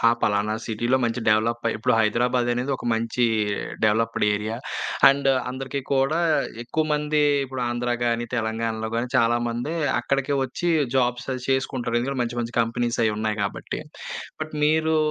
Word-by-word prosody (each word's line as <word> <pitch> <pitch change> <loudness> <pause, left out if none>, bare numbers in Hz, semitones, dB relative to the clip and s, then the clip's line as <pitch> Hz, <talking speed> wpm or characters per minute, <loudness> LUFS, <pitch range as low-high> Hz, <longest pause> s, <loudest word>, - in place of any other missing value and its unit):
ఆ - - +5
పలానా 105 +1 +1
సిటీలో 120 +3 +1
మంచి 115 +1 -1
డెవలప్ 115 +2 +2
అయి - - -1
ఇప్పుడు 110 - +1
హైదరాబాద్ 120 +3 +2
అనేది 125 +3 -2
ఒక - - -11
మంచీ 115 +2 0 0.6
డెవలప్‌డ్ 110 +1 +2
ఏరియా, 105 +2 -3 0.5
అండ్ 140 0 +2 0.2
అందరికీ 135 +2 -4
కూడా 135 +4 +2 0.4
ఎక్కువమంది 150 +2 0 0.2
ఇప్పుడు 130 -1 -5
ఆంధ్ర 120 +1 -2
గానీ, 120 0 0
తెలంగాణలో 110 -1 -2
గానీ, 120 +2 -1
చాలా 120 -1 +4
మంది 120 +6 -3 0.3
అక్కడికే 140 +1 0
ఒచ్చి 130 +7 -3 0.3
జాబ్స్ 125 -1 +1
అది 130 - -6
చేసుకుంటరు. 130 -3 0
ఎందుకంటే 135 +1 -2
మంచి 120 0 -3
మంచి 120 +1 -5
కంపెనీసయి 115 -1 0
ఉన్నాయి 110 0 -1
కాబట్టి 100 - -4 0.6
బట్ 155 0 -4
మీరూ 160 +1 +3
120 Hz, 145 wpm, -24 LUFS, 115-135 Hz, 0.6 s, ఆ